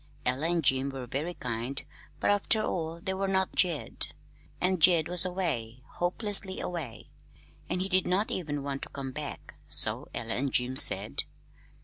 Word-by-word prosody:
Ella 130 +6 -1
and 170 -2 0
Jim 135 0 +1
were 135 -2 -7
very 150 +8 -4
kind; 125 +3 -6 0.3
but, - - +1
after 210 +2 +1
all, 165 -4 -4
they 190 +2 -4
were 195 +1 -3
not 190 -1 0
Jed, 170 -5 +1 0.4
and 185 -2 0
Jed 165 -2 +4
was 180 0 +6
away 130 -11 -3
hopelessly 195 +1 +1
away. 155 -10 -7 0.6
He 185 +1 -2
did 185 -1 +1
not 190 +4 0
even 145 -5 -4
want 140 -1 -5
to - - -6
come 135 -1 -7
back, 145 +2 -7
so - - +4
Ella 115 -1 -5
and 135 +1 -2
Jim 125 +1 0
said. - - +6
165 Hz, 160 wpm, -27 LUFS, 135-185 Hz, 0.6 s, was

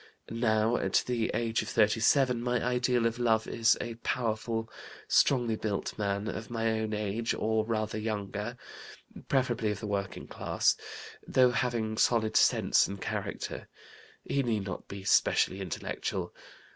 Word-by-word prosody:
Now, 115 0 +2
at - - +1
the 120 -3 -1
age 115 -1 0
of - - -6
37, 120 +4 +3
my 125 0 0
ideal 125 -1 +1
of 115 +1 0
love 110 -2 +2
is 115 0 +3
a 120 - -4
powerful, 115 -1 -1 0.4
strongly 120 -5 +3
built 105 -2 -3
man, 100 0 -2
of 110 0 -5
my 115 -1 0
own 110 -1 -2
age 105 +2 -1
or 110 0 +1
rather 110 -1 -1
younger 105 +1 -4 0.7
preferably 120 -5 +1
of 105 -1 -3
the - - -6
working 100 -2 -3
class. - - +1 0.5
Though 125 -1 +4
having 115 -3 -1
solid 110 -2 +2
sense - - +4
and 100 0 -6
character, - - -4 0.6
he 140 - 0
need 115 -6 -1
not 95 - -6
be 100 -1 -8
specially 95 0 +3
intellectual. 90 -4 -4
110 Hz, 145 wpm, -30 LUFS, 105-120 Hz, 0.7 s, Though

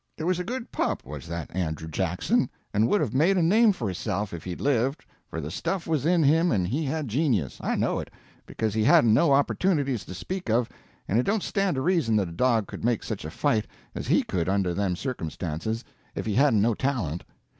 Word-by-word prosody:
It - - -5
was 180 +1 +1
a - - -1
good 245 +5 -5
pup, - - -1
was 75 +3 -8
that 85 0 -6
Andrew 80 -3 -2
Jackson, 95 - 0 0.2
and 105 +2 +3
would 205 - +2
have 125 -7 -1
made 165 +9 +3
a 175 - +3
name 215 +6 +5
for 130 - -3
hisself 100 +2 -3
if 85 - -6
he'd 90 -2 -5
lived, 135 +1 0 0.2
for 80 - -5
the 75 0 -5
stuff 190 - -2
was 155 -2 0
in 170 -2 +4
him 160 +5 +4
and 95 -5 +1
he 145 - -1
had 150 +1 -2
genius 115 - 0
I - - 0
know - - 0
it, - - -6 0.4
because 110 -2 -2
he 110 0 +1
hadn't 110 0 +6
no 145 +6 +4
opportunities 140 - +1
to 90 - -8
speak 180 - -5
of, 115 +1 +2 0.4
and 110 - +2
it - - +2
don't 200 +4 0
stand 195 -5 0
to 130 - -1
reason 165 -10 +2
that 100 -5 +1
a - - -9
dog 115 +4 +2
could - - -9
make 120 -1 +1
such - - -5
a - - -4
fight 110 -1 0 0.3
as - - -5
he - - +3
could 90 -1 -2
under 95 -2 +1
them 95 -1 0
circumstances 90 - -4 0.3
if - - -3
he 110 - -1
hadn't 125 -4 +4
no 115 +1 +3
talent. 105 - -2
115 Hz, 225 wpm, -26 LUFS, -, 0.4 s, hadn't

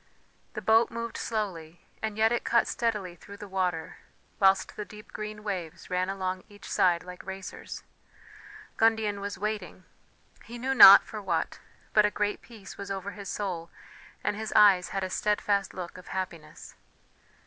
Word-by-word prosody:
The - - -5
boat 225 +1 +4
moved 230 0 -5
slowly, 175 -7 -4 0.2
and 220 -1 -3
yet 220 +1 +4
it 240 - 0
cut 235 - +3
steadily 210 -6 -2
through 200 +3 -12
the 205 - -9
water, 180 -4 -2 0.4
whilst 195 -1 +3
the 210 - -4
deep 210 0 -14
green 210 0 -6
waves 185 -5 -5
ran 180 +1 0
along 185 -1 -3
each 205 0 -13
side 175 -2 +2
like 180 0 -10
racers 190 0 -8 0.9
Gundian 220 -2 +2
was 200 0 -4
waiting... 205 -3 -4 0.6
he 240 - -9
knew 260 +3 -1
not 200 -6 +11
for 215 -2 -8
what, 175 -4 -2 0.3
but 210 - +6
a 210 - +3
great 210 0 -2
peace 220 -5 -12
was 200 0 -6
over 195 0 -4
his 200 -2 -8
soul, 175 -5 -4 0.5
and - - 0
his 220 +1 -5
eyes 195 -4 +6
had 195 -1 -2
a 185 - -2
steadfast 205 -1 0
look 180 -1 -7
of 180 - -15
happiness. 185 -4 -6
200 Hz, 165 wpm, -28 LUFS, 185-215 Hz, 0.9 s, not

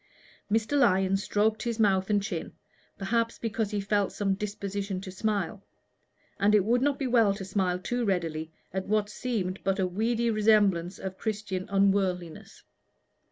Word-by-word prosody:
Mr. 225 +6 +1
Lyon 195 -6 +3
stroked 210 +2 +1
his 235 0 -3
mouth 195 -2 +3
and 205 -1 +2
chin, 185 -6 -4 0.4
perhaps 230 +3 0
because 220 -2 -2
he 210 -1 -2
felt 200 0 0
some 195 -2 0
disposition 200 -1 -4
to 190 0 -8
smile; 200 0 -2 0.8
and 210 +2 +4
it 200 -3 +4
would 240 +3 +2
not 285 0 +2
be 275 - -2
well 230 -5 +3
to 195 -1 -6
smile 185 -2 0
too 245 +7 -2
readily 165 -6 -1 0.2
at 190 0 -3
what 210 0 +1
seemed 210 -6 -3
but 195 0 +1
a 190 - +1
weedy 230 +5 0
resemblance 205 -5 +3
of 190 0 -6
Christian 205 -4 -3
unworldliness. 195 -4 0
200 Hz, 160 wpm, -28 LUFS, 190-220 Hz, 0.8 s, and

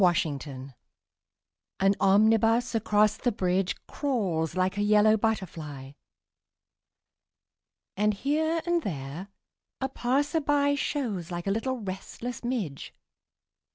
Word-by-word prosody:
SYMPHONY 175 -4 +3
IN 140 - -5 0.2
YELLOW 130 +1 -10 1.1
AN 195 +1 +4
omnibus 225 +4 +4
across 215 -1 +2
the 245 - 0
bridge 185 -2 0
Crawls 190 - -1
like 185 +1 +1
a 205 - -1
yellow 210 +1 +5
butterfly 165 - -3 2.0
And, 210 +1 +2
here 315 +8 0
and 345 -1 +1
there, 155 - -5 0.5
a 265 - -1
passer 280 +5 0
by 285 0 +2
Shows 240 - -2
like 175 -1 -5
a 195 - +1
little 250 +5 -1
restless 210 +6 -6
midge. 220 - -3
210 Hz, 115 wpm, -28 LUFS, 185-250 Hz, 2.0 s, yellow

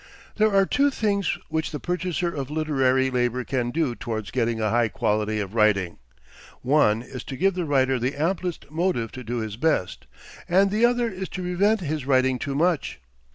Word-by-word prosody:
There 215 0 +3
are 195 -1 +4
two 285 +7 +2
things 200 - 0
which 160 0 -1
the 150 - -5
purchaser 180 -1 -2
of 135 -2 -4
literary 135 -4 +1
labor 125 0 0
can 125 -1 -1
do 135 -1 0
towards 115 -5 -5
getting 115 -2 0
a 110 -1 0
high 120 0 +3
quality 110 0 -1
of 100 -1 -4
writing. 105 -6 +2 0.6
One 120 -5 +3
is, 125 0 -8
to 135 - -6
give 195 +5 +2
the 180 -1 -2
writer 135 -3 +2
the 125 +4 -1
amplest 170 +1 -2
motive 160 -9 -1
to 130 - -8
do 120 +1 -3
his 110 -1 -5
best; 125 - -1 0.4
and 195 +3 +4
the 220 +3 +3
other 245 -1 +1
is, 190 -3 -5
to 185 - -5
prevent 195 +4 +1
his 155 -4 -3
writing 130 -1 +2
too 140 +2 -3
much. 165 - 0
140 Hz, 190 wpm, -24 LUFS, 120-180 Hz, 0.6 s, are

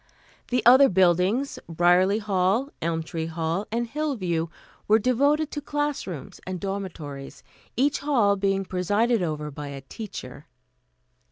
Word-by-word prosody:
The 250 -2 0
other 260 +3 +8
buildings, 190 +8 +2
Briarley 180 +5 +3
Hall, 205 +6 +1
Elmtree 160 0 -2
Hall 165 +4 -2
and 235 +1 0
Hillview, 225 - -2 0.4
were 215 - +6
devoted 280 +7 +2
to 295 - -4
class 290 -2 -2
rooms 160 -8 -8
and 185 -1 -4
dormitories, 160 -9 -6 0.3
each 280 +3 +2
hall 245 -9 +2
being 195 0 0
presided 205 +5 +1
over 150 -3 -3
by 145 +1 -7
a 140 -1 -7
teacher. 140 - -9
195 Hz, 125 wpm, -25 LUFS, 165-245 Hz, 0.4 s, other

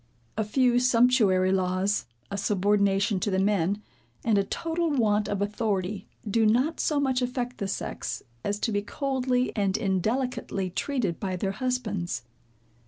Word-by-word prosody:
A 220 - 0
few 245 +3 +3
sumptuary 230 -7 +4
laws, 185 -4 +1 0.2
a - - -2
subordination 200 0 +2
to 205 - -1
the 190 - +1
men, 200 +1 +1 0.4
and 225 -2 +3
a - - +2
total 330 - -1
want 215 -7 +2
of 200 0 0
authority, 205 -2 -2 0.2
do 225 +2 +2
not 250 +9 +2
so 300 -2 +1
much 260 -2 +1
affect 250 0 -2
the 200 - -1
sex, 195 - -4 0.2
as 205 - -1
to 230 - 0
be 205 -1 +1
coldly 255 +1 -1
and 200 -2 +1
indelicately 215 -1 -1
treated 230 - -1
by 190 -2 -2
their 195 +2 -1
husbands. 205 - -2
210 Hz, 150 wpm, -27 LUFS, 195-250 Hz, 0.4 s, sumptuary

